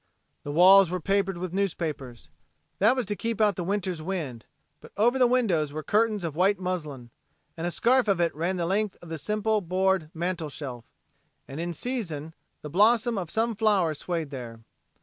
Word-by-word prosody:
The 145 - -6
walls 185 +3 +7
were 185 +1 -2
papered 195 +1 0
with 180 0 -5
newspapers. 155 -10 -3 0.5
That 220 +6 +4
was 255 -3 -1
to 205 +1 -3
keep 230 +1 -3
out 210 -2 +3
the 180 - -3
winter's 185 -3 -2
wind, 155 - -5 0.3
but - - -15
over 240 +5 +3
the 250 - +6
windows 195 - +1
were 155 +1 -5
curtains 215 0 +1
of 160 -3 -4
white 195 +4 +3
muslin, 150 -10 -5 0.4
and 170 +1 -3
a - - 0
scarf 245 +7 +2
of 195 -3 +2
it 170 -1 +1
ran 170 +5 -2
the 170 - -1
length 200 +3 -1
of 170 - -11
the 160 -1 -5
simple 215 +3 0
board 185 -2 0
mantel 170 -2 -2
shelf, 130 -5 -7 0.6
and 135 +3 -7
in 170 +1 -2
season 165 - -4 0.3
the - - -5
blossom 225 +5 +3
of 180 -5 -4
some 225 +5 0
flower 200 -7 +2
swayed 160 -1 -4
there. 120 -4 -8
185 Hz, 190 wpm, -26 LUFS, 155-210 Hz, 0.6 s, walls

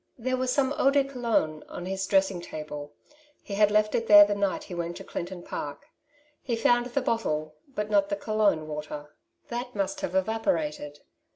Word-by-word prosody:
There 255 +2 -1
was 255 0 0
some 275 +1 +2
eau 270 - +5
de 280 0 +4
Cologne 235 - -1
on 175 - -6
his 190 +1 -2
dressing 195 -2 +2
table; 150 -3 -7 0.5
he 200 - -7
had 205 +1 +4
left 215 0 +2
it 230 - 0
there 205 -1 +10
the 205 - 0
night 200 -1 -1
he - - -9
went 170 0 -3
to - - -8
Clinton 175 0 -6
Park. 145 -4 -6 0.6
He 240 - -1
found 240 +1 +3
the 250 +3 -1
bottle, 155 -11 -1 0.2
but 210 0 -2
not 200 -1 +3
the 200 - 0
Cologne 200 -7 +1
water, 150 -1 -7 0.3
that 245 0 -4
must 195 -2 -2
have 180 - -3
evaporated 160 -8 -1
200 Hz, 185 wpm, -27 LUFS, 165-230 Hz, 0.6 s, there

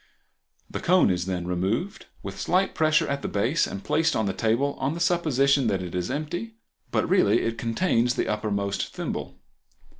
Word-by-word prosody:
The - - -5
cone 180 - +4
is 90 0 -2
then 90 -2 -2
removed, 95 - -2 0.2
with 95 0 -7
slight 185 +2 +1
pressure 155 -1 +2
at 140 0 -2
the - - -3
base, 120 +11 +1
and 100 - -6
placed 165 0 +1
on 110 - +1
the 95 - -1
table 120 +7 +1
on 135 +4 -1
the - - -5
supposition 140 -6 +2
that 95 -3 0
it 90 - -7
is 90 +2 -2
empty, 155 - -4 0.3
but - - +1
it - - -3
really 115 - +3
contains 120 +1 +1
the - - -1
uppermost 100 -2 -2
thimble. - - -4
120 Hz, 180 wpm, -25 LUFS, 100-155 Hz, 0.3 s, cone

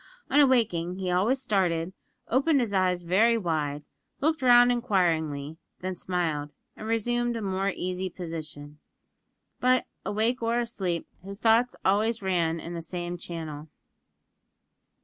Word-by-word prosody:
On 285 - +5
awaking, 215 - +3
he 185 -1 -2
always 210 +9 +2
started, 185 -8 0 0.3
opened 275 +4 +3
his 230 -5 -1
eyes 185 -2 +1
very 220 +7 +3
wide, 150 -7 -2 0.4
looked 310 0 +1
round 245 -1 +7
inquiringly, 160 - 0 0.2
then 185 0 -3
smiled, 165 -5 -2 0.3
and 215 - -8
resumed 240 +2 0
a 230 - -3
more 195 0 0
easy 185 0 -3
position. 155 -4 -7 0.8
But, 255 0 +3 0.2
awake 225 +4 0
or 230 +1 +1
asleep, 190 -8 -2 0.2
his 200 +1 -8
thoughts 230 +2 +3
ran - - -33
always 220 +3 0
in 170 -2 -1
the 170 - -4
same 175 +1 -5
channel. 160 -3 -6
185 Hz, 130 wpm, -27 LUFS, 170-235 Hz, 0.8 s, round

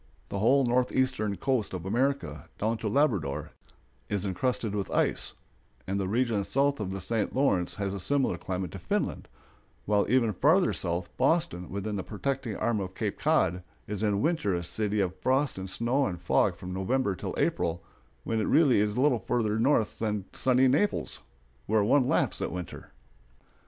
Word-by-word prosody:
The 100 - -3
whole 130 +6 +4
northeastern 125 -3 +1
coast 130 -8 -1
of 90 -1 -6
America, 120 - -1
down 110 +2 -1
to 110 - -3
Labrador, 105 - 0 0.6
is 100 -1 -1
incrusted 110 +3 -1
with 100 -2 -2
ice; - - 0 0.5
and 95 +1 -2
the 95 - -1
region 115 -1 +1
south 140 +6 +1
of 100 -3 -3
the 95 +1 -4
St. 105 +3 -2
Lawrence 100 -10 +1
has 100 -1 -2
a 100 - -4
similar 135 +2 +1
climate 90 -2 -4
to - - -7
Finland; - - -2 0.6
while 105 -1 +2
even 115 -3 +3
farther 160 - +3
south, 85 0 -3
Boston, 90 - +1
within 100 +2 -3
the 95 - -3
protecting 120 +2 -3
arm 115 -2 0
of 95 -1 -5
Cape - - -3
Cod, 90 +3 +2 0.2
is 105 -1 -4
in 105 0 +1
winter 155 - +1
a 85 - -2
city 105 +4 -1
of 95 -1 -1
frost 130 -3 +1
and 95 0 -5
snow 120 +8 +1
and 90 -2 -4
fog - - +2
from 90 0 -7
November 100 +3 0
till - - -5
April, 85 0 0 0.4
when 115 -1 -1
it - - 0
really 145 -9 +5
is 105 +1 0
little 130 -2 +3
farther 110 -3 0
north 115 -3 +2
than 105 -3 -1
sunny 130 0 +3
Naples, 145 +11 0 0.5
where 110 0 +3
one 125 +4 +3
laughs - - +1
at - - -2
winter. 90 -2 -7
105 Hz, 175 wpm, -28 LUFS, 95-130 Hz, 0.6 s, really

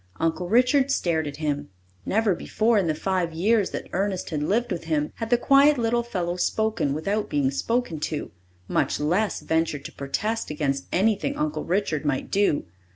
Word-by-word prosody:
Uncle 165 +2 -1
Richard 255 +5 +4
stared 165 - 0
at 145 - -5
him. 145 -2 -2 0.4
Never 215 -1 +2
before, 220 +5 +1
in 185 - 0
the 155 - 0
five 180 -1 -1
years 205 +4 +2
that - - -5
Ernest 190 -1 -1
had 150 -2 -1
lived 220 +10 0
with 170 -2 -3
him, 155 -2 0
had 225 -1 -4
the 240 - +4
quiet 280 +4 +5
little 235 0 +1
fellow 180 -7 -3
spoken 220 -6 0
without 200 +7 -1
being 140 -2 +1
spoken 230 - -1
to, 150 0 -3 0.4
much - - 0
less 180 +8 0
ventured 160 -3 -1
to - - -6
protest 210 +12 -3
against 140 -3 -2
anything 215 +8 +1
Uncle 300 0 -2
Richard 175 -4 0
might 145 -3 -2
do. 200 -7 +2
185 Hz, 175 wpm, -25 LUFS, 155-225 Hz, 0.4 s, quiet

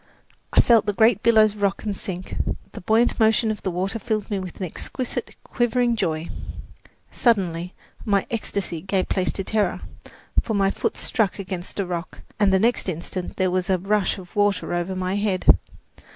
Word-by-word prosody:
I - - +4
felt 230 -3 +4
the 205 - +1
great 220 0 +4
billows 220 -2 +5
rock 200 -1 0
and 210 -2 -2
sink. 185 -1 -6 0.4
The 215 - -9
buoyant 225 +7 +2
motion 220 0 +4
of 210 - -5
the - - -1
water 190 +5 -2
filled 215 0 -2
me 200 - 0
with 185 -2 -7
an 190 - -1
exquisite, 250 - -5
quivering 240 -1 +1
joy. 160 -5 -1 0.8
Suddenly 180 -6 +1 0.3
my 200 -2 +2
ecstasy 200 -7 -3
gave 190 0 -1
place 185 -2 +1
to 195 - -3
terror; 205 -2 0 0.6
for 220 - -2
my 195 -1 +3
foot - - -2
struck 220 -5 0
against 185 -1 -5
a 195 - +1
rock 175 -1 -5 0.2
and 205 -2 +4
the 190 - +5
next 225 0 +1
instant 175 +2 -4
there 185 -1 +2
was 185 +2 -1
a 190 - +4
rush 200 +1 +1
of 185 +2 -12
water 205 -3 +1
over 175 +2 -1
my 185 +1 -1
head. 200 -3 0
195 Hz, 180 wpm, -23 LUFS, 185-220 Hz, 0.8 s, billows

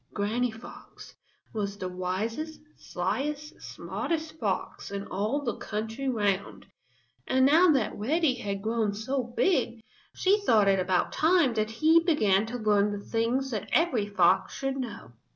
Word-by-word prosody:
Granny 225 +5 0
Fox 225 +1 -12 0.4
was 200 -2 -3
the 185 - -4
wisest, 210 - -3 0.2
slyest, 280 - -4
smartest 320 -1 -4
fox - - -3
in 200 0 -5
all 215 +9 -2
the 235 -5 -2
country 225 +5 -4
round, 205 -5 -1 0.6
and 260 0 +3
now 325 +6 +6
that 265 -9 +2
Reddy 290 +6 +1
had 200 -5 -4
grown 220 -2 0
so 260 +6 -2
big, 240 -2 0 0.3
she 395 +3 +3
thought 220 - +3
it 195 -1 +4
about 185 0 +1
time 320 -5 +3
that 215 -1 0
he 315 +9 +4
began 220 - +2
to 245 +2 -4
learn 210 -2 +2
the 205 0 -6
things 245 +4 0
that 215 -4 -4
every 265 -11 +2
fox 200 -3 +2
should 270 0 -2
know. 230 - -6
230 Hz, 150 wpm, -28 LUFS, 205-280 Hz, 0.6 s, now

